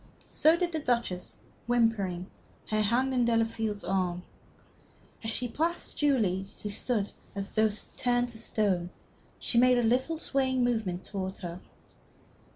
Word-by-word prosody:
So 315 +2 +5
did 350 -1 0
the 320 - -1
Duchess, 235 -10 -1 0.3
whimpering, 220 -7 +1 0.5
her 215 0 +2
hand 245 +5 +2
in 250 -1 +3
Delafield's 225 -2 0
arm. 180 -2 -1 1.0
As 225 - -1
she 245 +2 +2
passed 330 +8 -1
Julie, 210 -10 +1 0.2
who 210 - -2
stood 210 -1 0 0.2
as 200 0 -3
though 220 0 +3 0.3
turned 245 0 +1
to 225 -2 -5
stone, 195 -6 +1 0.5
she 235 - +2
made 250 0 +5
a 240 - +2
little 260 +8 +1
swaying 260 -4 +1
movement 220 -7 0
towards 190 -1 -5
her. 175 -1 -5
225 Hz, 140 wpm, -29 LUFS, 195-250 Hz, 1.0 s, So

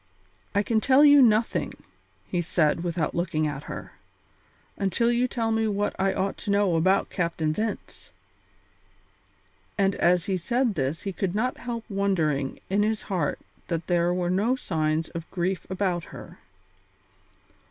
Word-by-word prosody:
"I 205 - +3
can 220 0 +1
tell 275 +4 +5
you 290 -1 +8
nothing," 225 -2 +2 0.5
he 175 - -1
said, 165 -1 +1
without 170 -3 -1
looking 170 -3 0
at 145 -1 -4
her, - - -7 0.8
"until 200 +4 +1
you 240 +1 +2
tell 230 -2 -1
me 225 0 +1
what 205 0 -1
I 195 0 +2
ought 195 +1 -2
to - - -6
know 200 -3 +2
about 185 +4 +2
Captain 165 -3 -1
Vince." 215 +3 -5 1.7
And 195 0 +2
as 175 -1 +2
he 190 -2 0
said 240 +6 0
this 145 -1 -2
he 195 - -3
could 190 0 -2
not 250 +4 0
help 235 -2 -5
wondering 170 - 0
in 200 +2 +1
his 215 +1 0
heart 175 -8 -1 0.3
that 165 -2 -2
there 175 -1 +2
were 180 0 0
no 210 +7 +2
signs 160 -7 -1
of 165 -1 -7
grief 185 +1 -2
about 185 -3 -1
her. - - -11
190 Hz, 150 wpm, -26 LUFS, 170-215 Hz, 1.7 s, you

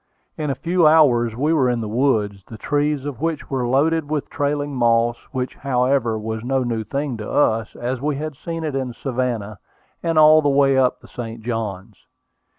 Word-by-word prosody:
In 150 -1 -3
a 135 - -1
few 170 +3 +2
hours 125 -8 +4
we 150 +6 +1
were 135 -6 +3
in 120 -1 0
the 110 - -4
woods, 105 -5 0
the 110 - -9
trees 145 +3 -1
of 145 -4 -6
which 165 -3 -3
were 130 -3 -1
loaded 145 +4 +1
with 150 -2 -3
trailing 145 0 -1
moss, 120 -1 +2 0.2
which, 130 -2 -3
however, 125 -3 +1
was 110 +1 -4
no 130 +1 0
new 115 -2 -2
thing 135 +3 -3
to 105 - -6
us, 110 -6 +1
as 125 +1 -3
we 150 0 -1
had 155 +1 -5
seen 165 +4 -5
it 155 -3 -3
in 130 -2 -3
Savannah, 120 -6 -3 0.4
and 165 -1 -1
all 155 0 +7
the 145 - +1
way 135 -1 +3
up 130 -1 +2
the - - -15
St. 115 -2 -7
Johns. 110 -3 -5
130 Hz, 195 wpm, -21 LUFS, 115-145 Hz, 0.4 s, all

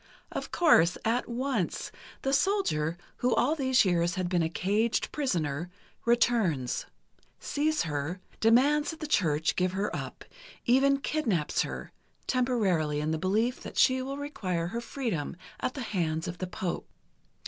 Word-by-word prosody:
Of - - -5
course, 180 - +5
at 235 +3 +1
once, 240 -5 -2 0.3
the 270 - 0
soldier, 275 - +1 0.2
who 250 0 +2
all 280 +5 +3
these 260 -6 +3
years 175 -1 +2
has 185 - -1
been 175 -1 +1
a 160 - +1
caged 210 +7 0
prisoner, 170 - -1 0.4
returns, 230 - +2 0.5
sees 310 +2 0
her, 155 +3 -3 0.2
demands 270 +7 +4
that 320 - -6
the - - -4
Church 160 - +1
give 185 0 +1
her 195 +2 -1
up, - - -6 0.4
even 275 +3 +4
kidnaps 220 - 0
her, - - -5 0.3
temporarily 195 - +1
in 150 +1 -1
the 160 - -1
belief 220 +7 +1
that - - -8
she 260 0 +4
will 270 +2 -4
require 185 - -2
her 235 +5 -3
freedom 225 - -3 0.2
at 255 - -2
the 270 - -4
hands 165 -8 -1
of 175 0 -6
the 185 - -3
Pope. 180 0 -4
215 Hz, 150 wpm, -29 LUFS, 170-260 Hz, 0.5 s, course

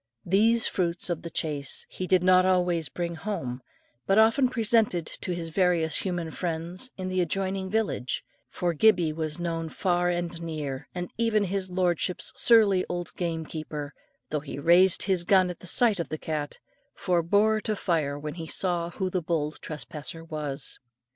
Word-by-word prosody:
These 220 +5 +4
fruits 175 -1 0
of 170 - -2
the 170 - -6
chase 145 -4 -1
he 185 - -5
did 185 -1 +3
not 185 0 +6
always 180 -5 +1
bring 170 +3 -3
home, 145 -9 -4 0.5
but 195 - +3
often 225 +4 +5
presented 225 -7 +2
to 180 - -4
his 165 -1 -4
various 170 -2 +2
human 175 -4 -3
friends 175 +7 -3
in 185 -1 -4
the 185 0 0
adjoining 190 +2 -2
village; 205 - -1 0.3
for 175 -1 -1
Gibbie 175 -2 +3
was 155 -1 -2
known 165 -2 -3
far 175 0 0
and 175 -1 -3
near, 150 -5 -5
and 180 0 -4
even 225 -2 +2
his 190 -1 -1
lordship's 180 -1 0
surly 210 -6 +5
old 175 -1 -4
gamekeeper, 155 -3 -4 0.4
though 150 - 0
he 140 -1 -8
raised 175 +5 +5
his 190 -3 +2
gun 185 0 +4
at 175 - -10
the 185 - -6
sight 220 0 +4
of 170 - -3
the 155 - -3
cat, 150 -2 -4 0.4
forbore 200 +5 +2
to 215 - -2
fire 155 -7 -1
when 150 +1 -5
he 165 -2 -7
saw 175 -2 0
who 190 +2 -3
the 185 0 -1
bold 155 -2 -2
trespasser 155 +1 -6
was. 150 -4 -4
175 Hz, 165 wpm, -27 LUFS, 160-190 Hz, 0.5 s, not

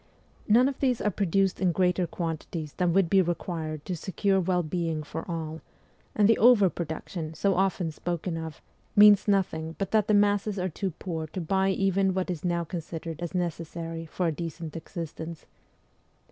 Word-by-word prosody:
None 240 +5 +5
of 275 -1 -3
these 255 -4 +1
are 210 - 0
produced 195 0 +1
in 185 -2 +3
greater 180 0 +1
quantities 160 -2 -4
than 180 -2 +1
would 190 0 +3
be 190 +3 +5
required 165 -3 -3
to 180 - -2
secure 190 +3 0
well 180 -1 +1
being 165 -1 -2
for 160 +4 -7
all; 160 -1 -4 0.5
and 205 -1 +5
the 225 - +4
over 215 -6 +6
production, 160 0 -5
so 200 +3 +2
often 190 -3 0
spoken 175 +2 -3
of, 160 -1 -7 0.3
means 205 0 +7
nothing 165 -5 0
but 195 -2 -3
that 215 -2 +3
the 215 - +4
masses 205 0 +2
are 185 0 -1
too 190 +4 -3
poor 160 -3 -4
to 185 - -6
buy 190 +3 +1
even 195 0 +1
what 185 -1 -1
is 165 -4 -5
now 170 -1 0
considered 165 -1 -6
as 175 +1 -4
necessary 165 -1 -3
for 180 +3 -2
a 165 - +2
decent 165 0 -6
existence. 165 0 -7
175 Hz, 175 wpm, -27 LUFS, 165-195 Hz, 0.5 s, means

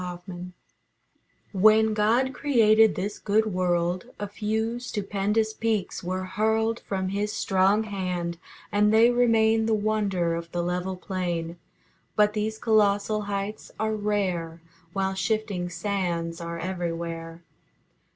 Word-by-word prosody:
LINCOLN 180 0 -7 1.0
When 215 +2 +5
God 230 +5 +2
created 225 -6 +4
this 200 +3 -3
good 215 +2 +2
world 180 +2 0
A 205 - -3
few 220 +3 -2
stupendous 210 -1 -1
peaks 220 -5 -2
were 185 +1 -2
hurled 220 +4 0
From 190 -1 -3
His 205 +2 -1
strong 195 +3 +2
hand, 180 -5 -3 0.3
and 210 +1 +3
they 225 +2 +6
remain 225 -2 +3
The 220 - +3
wonder 205 -5 0
of 170 0 -5
the 175 -1 -1
level 180 +2 -2
plain. 175 -3 -3 0.6
But 210 0 +4
these 215 +1 -2
colossal 215 -1 +2
heights 200 +1 -4
are 220 0 0
rare, 185 -6 -1 0.3
While 195 -1 0
shifting 200 -3 -1
sands 175 -3 -2
are 170 0 -5
everywhere. 170 -2 -4
200 Hz, 120 wpm, -26 LUFS, 180-220 Hz, 1.0 s, they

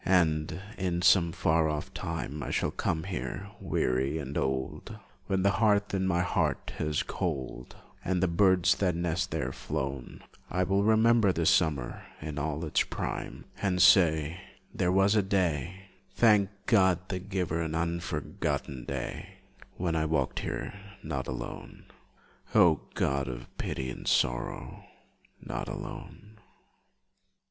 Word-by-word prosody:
And, 80 -4 +2 0.2
in 90 -2 -1
some 85 -3 +5
far 80 0 +2
off 75 -1 -4
time, 75 +2 -4
I - - -4
shall - - 0
come 80 -1 -1
here, 95 +1 -5
weary 65 +4 0
and 70 -2 -5
old, 65 -1 -2 0.3
When 95 -1 +1
the 100 - +4
hearth 105 -2 +3
in 95 -1 +1
my 85 -1 +2
heart 90 - -1
is 75 -1 0
cold 65 -6 -4 0.3
And 95 0 0
the - - +4
birds 95 +1 +4
that 90 -4 +1
nest 85 +2 -1
there 75 -5 -2
flown; 70 -3 -5 0.3
I 90 +1 +1
will 95 +2 +2
remember 110 -1 +5
this 85 -2 +3
summer 75 -8 +1 0.2
in 75 -1 -5
all 80 +2 -2
its 75 - +2
prime - - -4 0.2
And 95 -3 +1
say, 85 -2 +5 0.3
"There 90 - +1
was 95 +2 +4
a 105 - +4
day 95 -1 -1 0.3
Thank 105 -4 +5 0.2
God, 95 -4 +3
the 95 - -2
Giver, 90 -4 -2
an 80 -1 -2
unforgotten 85 -6 -2
day, 70 -3 -5 0.4
When 85 -2 -1
I 80 -1 +1
walked 80 -4 0
here, - - -4 0.3
not - - -3
alone, - - -7 0.7
O 80 -4 +6
God 70 0 0
of - - -7
pity 65 -1 -3
and - - -8
sorrow, - - 0 0.6
not - - -5
alone!" 105 +1 -8
85 Hz, 140 wpm, -29 LUFS, 75-95 Hz, 0.7 s, O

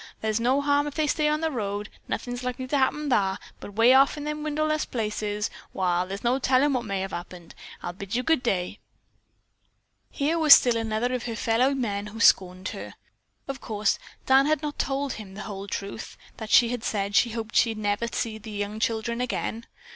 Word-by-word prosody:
Thar's 220 0 +1
no 255 +4 +2
harm 285 0 +2
if 290 - -6
they 310 - +1
stay 300 0 +1
on 305 +1 0
the 320 -1 0
road. 205 -4 -3 0.2
Nothin's 245 0 -4
likely 250 +1 -3
to 255 - -2
happen 285 +2 0
thar, 195 -4 +2 0.2
but 205 - -10
'way 230 +3 +6
off 275 +3 +5
in 295 - -5
the 300 0 -2
wilderness 310 0 -1
places, 210 -2 -2 0.2
wall, 180 -1 0
thar's 195 +2 -6
no 245 +3 +2
tellin' 270 +2 +3
what 245 -2 -1
may 195 -2 -2
have 195 0 -4
happened. 175 -1 -8 0.3
I'll 175 - -4
bid 195 +3 -6
you 250 - 0
good 320 0 +2
day." 195 -4 -1 1.3
Here 310 +4 0
was 310 -3 +10
still 245 -2 +2
another 225 +2 -1
of 250 -2 -3
her 230 - -3
fellow 235 +5 +2
men 210 -5 -2
who 220 +2 -9
scorned 185 -4 +3
her. - - -8 0.5
Of 270 -2 -5
course, 210 -2 0 0.3
Dan 270 +2 +5
had 310 -1 +1
not 295 -1 -4
told 275 0 -1
him 195 -3 -9
the 210 - -6
whole 200 -2 -7
truth, 200 +2 -6 0.2
that 220 -2 -7
she 235 +1 +6
had 245 -2 -3
said 200 -1 -2
she 240 - +5
hoped 225 -1 -5
she 230 -2 +3
never 205 +1 -1
again - - -3
would - - -8
see 225 -2 -2
the 210 -1 -5
children. 235 +1 -2
230 Hz, 205 wpm, -26 LUFS, 205-270 Hz, 1.3 s, was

